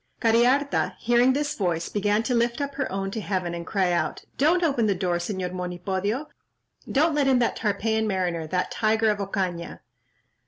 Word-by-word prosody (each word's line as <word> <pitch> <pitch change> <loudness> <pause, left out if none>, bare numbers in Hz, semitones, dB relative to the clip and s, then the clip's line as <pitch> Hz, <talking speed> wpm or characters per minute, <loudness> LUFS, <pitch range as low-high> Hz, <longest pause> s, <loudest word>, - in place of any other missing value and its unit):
Cariharta 245 +5 +2
hearing 240 +2 +3
this 290 +1 -1
voice, 170 -4 -1
began 205 +1 +1
to 250 - -1
lift 235 +1 +1
up 280 -1 -3
her 270 -5 -3
own 195 0 -2
to 220 - -4
heaven, 185 -4 -2
and 170 -1 -6
cried 190 -4 +1
out, 170 - -1
"Don't 335 +6 +3
open 270 -9 +2
the 200 - +2
door, 175 -1 0
Señor 180 0 -3
Monipodio; 190 - -2 0.7
don't 310 +4 +3
let 290 -2 +2
in 265 -1 +4
that 240 -1 +1
Tarpeian 220 +1 0
mariner—that 180 -3 -1
tiger 220 0 +2
of 205 - -3
Ocaña." 185 -4 -3
210 Hz, 170 wpm, -25 LUFS, 185-245 Hz, 0.7 s, in